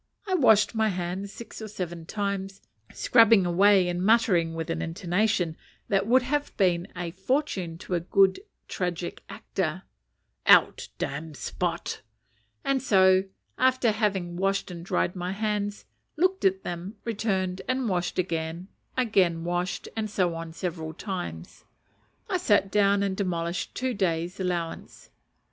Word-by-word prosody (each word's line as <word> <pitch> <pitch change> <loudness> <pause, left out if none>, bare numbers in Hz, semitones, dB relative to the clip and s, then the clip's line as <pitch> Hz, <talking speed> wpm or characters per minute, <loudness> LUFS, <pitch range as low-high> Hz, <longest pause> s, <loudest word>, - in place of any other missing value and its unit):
I 380 - -1
washed 220 - +5
my 220 -1 +2
hands 185 +1 -3
six 230 +1 -10
or 220 - -5
seven 175 -5 -6
times, 200 -1 -3 0.3
scrubbing 225 -5 +5
away 190 +1 +5
and 175 0 -2
muttering 190 -7 +3
with 165 +1 -3
an - - -2
intonation 180 0 0 0.3
that 195 0 +2
would 250 +2 +5
have 290 +3 -2
been 175 -3 +2
a 175 -1 -4
fortune 190 - -1
to 180 - -6
a 170 - +1 0.7
tragic 180 -2 -3
actor, - - -3 0.6
"Out, - - +5
damned 150 +1 -4
spot;" 175 -1 -3 0.6
and 275 -1 +1
so, 190 -5 +4 0.3
after 255 -3 +3
having 195 -5 -1
washed 195 0 0
and 170 -1 -7
dried 175 0 0
my 180 +1 -3
hands, 205 0 -2 0.3
looked 370 +3 +1
at 190 0 +2
them, 175 +5 -5
returned, 195 -5 -1
and 255 -1 0
washed 180 -3 -1
again, 170 0 -2 0.3
again 185 -9 +2
washed, 175 +1 -2
and 220 -1 -2
so 185 -4 +1
on, 165 0 -6
several 160 -2 -5
times, 90 - -6 0.6
I 385 -5 0
sat 205 - +2
down 200 -1 +3
and 195 -1 -1
demolished 175 -3 -2
two 255 0 -1
days' 175 -2 -1
allowance. 175 -3 -4
190 Hz, 140 wpm, -27 LUFS, 175-215 Hz, 0.7 s, washed